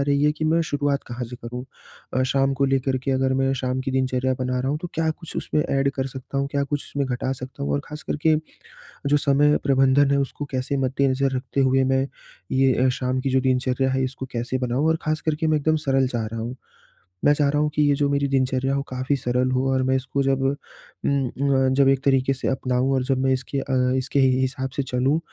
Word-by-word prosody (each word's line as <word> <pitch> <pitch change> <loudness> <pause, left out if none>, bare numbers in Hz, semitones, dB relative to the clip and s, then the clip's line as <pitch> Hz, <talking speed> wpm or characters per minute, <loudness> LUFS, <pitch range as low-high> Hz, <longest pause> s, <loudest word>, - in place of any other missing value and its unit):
रही 140 0 +1
है 150 - +4
कि 155 +1 -4
मैं 160 +2 +3
शुरुआत 145 -2 -1
कहाँ 120 +1 -5
से 120 +1 -8
करूँ? 125 +1 -7 0.5
अ, 130 - +2
शाम 135 +1 +1
को 140 - +1
लेकर 135 -1 +1
के - - 0
अगर 130 0 +1
मैं 135 0 +1
शाम 130 0 -2
की 135 - -3
दिनचर्या 130 0 0
बना 125 0 -1
रहा 130 - -1
हूँ 150 - -1
तो 175 - -4
क्या 160 0 +1
कुछ 165 +1 -8
उसमें 150 - 0
ऐड 140 0 +1
कर 135 0 -1
सकता 135 +1 -6
हूँ 140 0 -1
क्या 140 0 +1
कुछ 145 +1 -3
उसमें 140 -2 -1
घटा 130 +1 -2
सकता 130 - -8
हूँ 70 - -1
और 70 - +1
ख़ास 150 0 -8
करके, 155 +1 +1 0.7
जो 145 +1 +4
समय 145 +1 +3
प्रबंधन 135 0 +4
है 140 - +3
उसको 140 +1 -3
कैसे 130 +2 -1
मद्देनज़र 135 0 +1
रखते 130 +1 -3
हुए 130 0 +3
मैं 135 +1 +2 0.4
ये 130 -1 +3
अ, 130 - +4
शाम 130 0 -1
की 135 +1 -1
जो 130 0 +2
दिनचर्या 130 0 +1
है 130 0 0
इसको 130 0 -4
कैसे 120 +2 -2
बनाऊँ? 130 +4 0
और 160 - +3
ख़ास 155 0 -1
करके 155 0 -1
मैं 155 -1 +3
एकदम 155 +2 +1
सरल 135 -1 +2
चाह 120 -3 -2
रहा 115 +1 -5
हूँ, 120 +3 -5 0.7
मैं 145 - +6
चाह 145 -1 +2
रहा 150 +1 +1
हूँ 150 - +1
कि 150 - +2
ये 145 -1 +4
जो 145 0 +1
मेरी 140 0 +1
दिनचर्या 135 0 +1
हो 140 - 0
काफ़ी 130 +2 -1
सरल 125 +1 0
हो 130 +1 +1
और 130 0 +1
मैं 130 0 +2
इसको 135 +1 -1
जब 135 0 +1
उम, 140 0 -3
अ, 135 -1 +1
जब 135 0 +4
एक 135 0 +2
तरीक़े 135 0 +3
से 130 - -4
अपनाऊँ 130 0 0
और 130 - +1
जब 130 0 0
मैं 135 - +2
इसके 130 +2 -2
अ, 135 - -3 0.2
इसके 135 +2 0
ही 130 -1 +4
हिसाब 130 0 -2
से 140 - +1
चलूँ, 130 +4 +1
135 Hz, 240 wpm, -23 LUFS, 130-140 Hz, 0.7 s, मैं